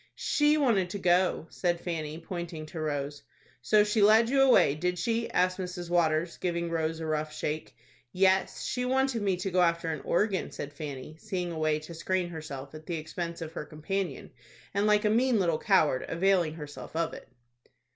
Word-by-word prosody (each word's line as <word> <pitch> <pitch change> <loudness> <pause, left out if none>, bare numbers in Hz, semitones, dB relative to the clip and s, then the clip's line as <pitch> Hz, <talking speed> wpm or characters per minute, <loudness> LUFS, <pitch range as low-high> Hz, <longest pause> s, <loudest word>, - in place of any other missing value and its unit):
"She 295 +1 +2
wanted 225 -11 +2
to 200 - -4
go," 180 -2 +2
said 175 -2 0
Fanny, 160 -3 -4
pointing 170 -1 -6
to 160 +1 -8
Rose. 145 -2 -3 0.4
"So 210 - +4
she 210 +1 +1
led 220 +3 +6
you 275 0 +4
away, 255 - +6
did 180 +4 -1
she?" 230 +4 -1
asked 185 +1 +1
Mrs. 180 -2 -5
Waters, 170 -1 +1
giving 170 -1 -2
Rose 160 0 -1
a 160 - -4
rough 155 -1 -1
shake. 155 0 -4 0.4
"Yes, 190 0 +2
she 250 - -2
wanted 260 -2 +1
me 195 -3 +1
to 185 +2 -3
go 180 0 +3
after 170 -1 +2
an 155 - -4
organ," 190 0 0
said 145 0 -7
Fanny, 145 0 -7
seeing 185 -5 -3
a 160 - -5
way 155 -1 +2
to 155 +2 -9
screen 180 +2 -1
herself 145 -4 -7
at 155 0 -11
the 170 - -2
expense 170 +2 -5
of 160 - -7
her - - -4
companion, 175 +6 -4 0.4
and 200 +1 +1
like 210 0 +3
a - - +4
mean 245 +1 +3
little 170 -4 +1
coward 155 -10 +3
availing 175 -2 +2
herself 150 0 -9
of 165 0 0
it. - - -10
175 Hz, 190 wpm, -29 LUFS, 155-195 Hz, 0.4 s, led